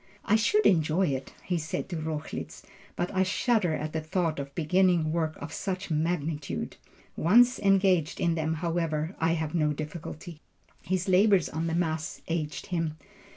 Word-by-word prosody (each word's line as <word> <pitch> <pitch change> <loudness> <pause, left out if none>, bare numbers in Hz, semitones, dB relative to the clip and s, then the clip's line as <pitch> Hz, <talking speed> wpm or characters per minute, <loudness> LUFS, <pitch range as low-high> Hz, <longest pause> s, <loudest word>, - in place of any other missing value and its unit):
"I 215 - +4
should 410 - +3
enjoy 165 0 +3
it," 135 -1 -3
he 180 -2 -1
said 155 0 -3
to 180 - -4
Rochlitz, 155 -1 -5 0.3
"but 175 - -2
I 190 - +2
shudder 190 -2 +2
at 155 +1 -4
the 160 - -1
thought 160 -1 -1
of 140 0 -6
beginning 175 -1 +2
works 160 -1 -1
of - - -7
such 190 -2 -4
magnitude. 155 -2 -2 0.4
Once 240 +9 +5
engaged 190 -5 +3
on 170 - +2
them, 160 0 -1
however, 165 0 -1
I 165 +1 +2
have 160 -2 -2
no 150 -3 +2
difficulty." 155 +2 -7 0.4
His 185 +1 -1
labors 195 -1 +4
on 160 +2 -2
the 165 - -1
Mass 160 -2 -2
aged 160 -2 -3
him. 165 -2 -1
165 Hz, 160 wpm, -28 LUFS, 155-185 Hz, 0.4 s, Once